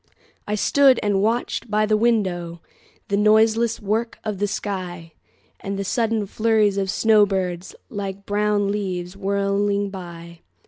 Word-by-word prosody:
I 210 - -1
stood 270 +4 +4
and 200 -2 +1
watched 230 +1 -1
by 215 0 +2
the 215 0 +2
windowThe 190 -7 0 0.5
noiseless 220 +2 +3
work 220 +3 -2
of 210 -3 -4
the 205 - +1
sky, 180 -5 -5 0.5
And 195 0 -4
the 200 - -2
sudden 225 +1 0
flurries 215 -1 +1
of 195 -1 -2
snow 215 0 +4
birds, 185 -2 -3
Like 200 -1 -6
brown 205 -1 +1
leaves 185 -3 -4
whirling 200 0 0
by. 170 -3 -9
205 Hz, 135 wpm, -22 LUFS, 190-215 Hz, 0.5 s, stood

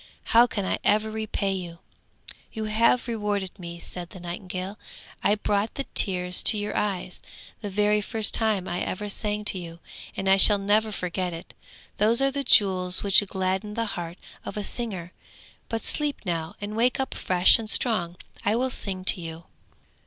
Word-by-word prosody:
How 235 +2 +7
can 205 -4 -3
I - - -1
ever 215 +1 +2
repay 215 -2 -2
you?' 175 -3 -6 0.7
'You 220 - -5
have 230 +4 +2
rewarded 210 -4 -3
me,' 170 -1 -8
said 175 0 -6
the 185 - -11
nightingale. 185 +3 -6 0.4
'I 205 - +3
brought 210 0 -1
the 275 - -3
tears 180 -2 +1
to 220 - +5
your 205 0 -3
eyes, 190 -3 -2 0.4
the 205 - -4
very 210 +1 +2
first 215 0 0
time 215 -5 0
I 175 - -3
ever 205 +2 -4
sang 210 0 -1
to 190 - -1
you, 170 -1 -9 0.4
and 195 - -3
I 195 0 +5
shall 205 +2 +8
never 210 +2 +1
forget 180 -2 -3
it! 165 - -9 0.4
Those 220 +3 +3
are 275 0 +3
the 280 +1 -2
jewels 185 -6 +3
which 200 0 +6
gladden 190 +2 -2
the 230 - -1
heart 170 0 -6 0.3
of - - -7
a 210 - -2
singer; 190 -6 -1 0.6
but 225 0 -3
sleep 295 -2 -1
now, 165 -2 -3
and 205 +1 -6
wake 245 +4 +1
up 265 - -2
fresh 180 +4 +4
and 220 -1 -4
strong! 185 -9 +2 0.3
I 210 - +1
will 255 +2 0
sing 190 -5 -3
to 185 - +5
you!' 165 0 -8
205 Hz, 180 wpm, -25 LUFS, 180-220 Hz, 0.7 s, shall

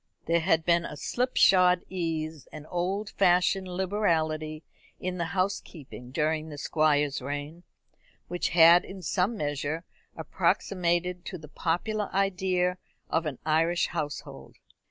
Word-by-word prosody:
There 170 0 +2
had 165 -1 +2
been 170 -1 +3
a 150 - -7
slipshod 185 - +3
ease, 160 -4 -4
an 150 -1 -9
old 185 +5 -2
fashioned 185 0 +2
liberality 165 -5 -1 0.4
in 180 0 -4
the 170 - 0
housekeeping 165 -9 -3
during 155 +3 -1
the 145 - -8
Squire's 145 -2 +1
reign, 145 +5 -5 0.7
which 175 0 -1
had 170 +1 +7
in 190 -1 -10
some 190 +7 0
measure 145 +1 -2 0.3
approximated 180 -1 0
to 185 - -5
the 155 -2 -12
popular 195 +7 -2
idea 185 -2 +1 0.3
of 160 0 +1
an 140 -4 -4
Irish 165 +2 +2
household. 145 -1 -6
170 Hz, 125 wpm, -28 LUFS, 155-185 Hz, 0.7 s, had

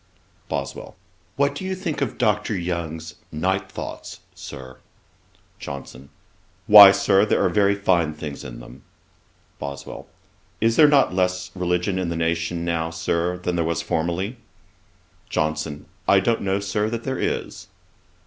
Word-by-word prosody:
BOSWELL. - - -5 0.4
'What 140 0 +1
do 145 - -7
you 190 0 -2
think 170 -6 -4
of 135 - -2
Dr. 105 0 +1
Young's 80 -3 -4 0.2
Night 95 +4 -1
Thoughts, - - -7
Sir?' 65 -2 -10 0.8
JOHNSON. 70 0 -8 0.6
'Why, 105 -1 +11
Sir, 95 0 +3
there 105 - +2
are - - +3
very 100 -1 +3
fine 85 -6 +1
things 75 -2 -7
in - - -9
them.' - - -13 0.8
BOSWELL. 70 0 -7 0.5
'Is 115 +1 +2
there 155 - +7
not 140 -9 +4
less 90 0 -1
religion 90 +1 0
in 90 -2 -2
the 85 - -3
nation 85 +1 -1
now, 80 -1 -1
Sir, 85 +2 -1
than 90 0 -3
there 85 - +1
was 80 -1 -1
formerly?' 85 +8 -2 0.9
JOHNSON. 75 -1 -2 0.2
'I 100 - +6
don't 115 +3 +1
know, 95 0 0
Sir, 105 +2 -1
that 115 0 -4
there 130 0 -3
is.' - - -3
90 Hz, 145 wpm, -23 LUFS, 80-100 Hz, 0.9 s, Why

